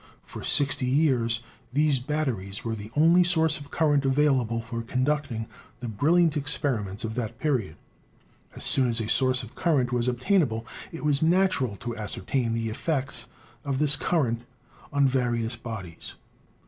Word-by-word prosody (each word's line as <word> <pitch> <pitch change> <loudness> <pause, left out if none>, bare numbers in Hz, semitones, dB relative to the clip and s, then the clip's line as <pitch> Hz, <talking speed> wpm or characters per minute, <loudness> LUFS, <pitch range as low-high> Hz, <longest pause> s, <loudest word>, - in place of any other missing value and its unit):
For - - -9
sixty 140 -2 +2
years 125 -5 +2 0.3
these 145 0 +2
batteries 125 -9 -3
were 115 - -1
the 105 -1 -7
only 165 +4 +5
source 160 -2 +2
of 145 -1 -12
current 145 -3 +2
available 135 -4 +2
for 115 0 -5
conducting 130 -1 -1 0.3
the 125 - -5
brilliant 155 +9 +2
experiments 125 -8 0
of 110 -1 -3
that 115 -2 -4
period. 120 - -1 0.8
As - - -4
soon 130 -2 +4
as 115 -1 -1
a 110 - -3
source 130 +2 +3
of 115 - -11
current 135 -8 +1
was 120 0 0
obtainable 125 - +1 0.3
it 165 -2 -7
was 145 -2 +2
natural 165 - +2
to 115 +3 -6
ascertain 115 +2 -2
the 115 -1 -2
effects 130 0 -1 0.4
of 140 -2 -2
this 145 0 +4
current 130 -8 0 0.5
on 140 -1 +3
various 120 -3 0
bodies. 110 -8 -8
130 Hz, 150 wpm, -26 LUFS, 115-150 Hz, 0.8 s, only